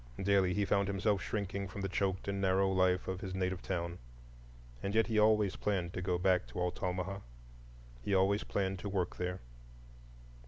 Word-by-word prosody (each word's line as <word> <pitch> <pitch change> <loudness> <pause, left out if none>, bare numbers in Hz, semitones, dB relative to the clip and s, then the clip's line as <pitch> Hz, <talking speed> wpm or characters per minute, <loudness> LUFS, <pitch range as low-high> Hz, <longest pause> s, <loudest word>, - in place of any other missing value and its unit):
Daily 95 -2 +3
he 105 -1 +2
found 100 0 +2
himself 100 0 +1
shrinking 100 -1 -3
from 100 +1 -7
the 95 - 0
choked 95 0 -1
and 100 0 -1
narrow 95 0 +3
life 95 -1 +2
of 95 0 -3
his 95 -1 -4
native 95 -1 -1
town. 85 -1 -3 0.8
And 100 +2 -2
yet 115 - +5
he 110 -2 +1
always 105 -2 +4
planned 90 -4 -1
to 90 - -3
go 90 -1 0
back 90 0 +2
to - - -6
Altamaha,—always 90 - -2
planned 95 -1 -1
to 100 - -4
work 95 -3 -1
there. 90 0 -3
95 Hz, 165 wpm, -34 LUFS, 90-100 Hz, 0.8 s, yet